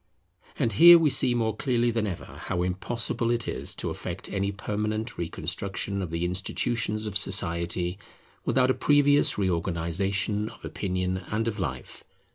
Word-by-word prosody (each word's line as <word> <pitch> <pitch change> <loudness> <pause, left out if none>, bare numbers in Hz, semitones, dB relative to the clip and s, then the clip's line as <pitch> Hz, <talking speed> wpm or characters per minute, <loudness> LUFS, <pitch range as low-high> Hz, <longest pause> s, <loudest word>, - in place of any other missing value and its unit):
And 115 - 0
here 170 +11 +9
we 160 -3 +2
see 130 -1 +4
more 110 -2 0
clearly 120 -1 0
than 115 -2 -1
ever 90 -4 -5
how 90 -1 -4
impossible 115 +5 -2
it 120 -2 -1
is - - -2
to - - -3
effect - - -6
any 100 0 -1
permanent 105 +3 -3
reconstruction 100 +3 -3
of 90 - -4
the 85 +1 -2
institutions 105 +4 -1
of 105 -2 -5
society, 85 -1 +2 0.4
without 130 0 +2
a - - +2
previous 145 0 +3
reorganization 95 +3 -1
of 115 - -13
opinion 95 -1 -2
and 110 +2 -1
of 110 -2 -3
life. 65 -8 -5
100 Hz, 150 wpm, -26 LUFS, 90-115 Hz, 0.4 s, here